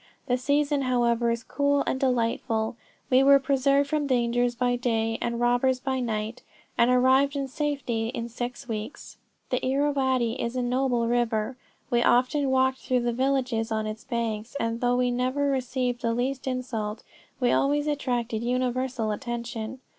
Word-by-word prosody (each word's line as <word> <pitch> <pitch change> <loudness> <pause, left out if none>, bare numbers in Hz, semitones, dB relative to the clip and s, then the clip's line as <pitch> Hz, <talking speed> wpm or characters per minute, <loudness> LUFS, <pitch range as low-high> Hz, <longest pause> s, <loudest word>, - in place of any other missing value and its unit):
The 245 - +1
season 285 +2 +1
however 240 -2 +1
is 230 0 -1
cool 285 +2 +1
and 260 - -1
delightful, 230 -3 0 0.4
we 255 +1 +6
were 280 +1 +7
preserved 275 +1 +2
from 295 0 -1
dangers 245 -1 +1
by 245 0 +1
day 225 -2 -1
and 235 0 -2
robbers 245 +2 +2
by 260 0 -2
night, 220 -1 -3 0.3
and 235 - +4
arrived 260 +3 +4
in 275 -1 -2
safety 265 -5 -2
in 230 0 -4
six 245 +2 -6
weeks. 220 +3 -6 0.3
The 255 - 0
Irrawaddy 265 -3 +1
is 235 +2 -3
a 250 - 0
noble 245 -1 +1
river; 235 0 0 0.4
we 240 -1 +3
often 260 +4 +3
walked 260 0 +2
through 250 -1 0
the 240 0 0
villages 255 -3 0
on 220 0 -1
its 215 +2 -5
banks, 230 -2 -3
and 230 -1 -2
though 245 0 +2
we 250 0 +2
never 255 +3 0
received 255 -2 -1
the 230 -1 0
least 260 +2 -2
insult, 235 -4 -3 0.4
we 245 -2 +2
always 290 +1 +2
attracted 245 -6 -1
universal 250 -1 -1
attention. 235 +1 -5
250 Hz, 160 wpm, -26 LUFS, 235-265 Hz, 0.4 s, were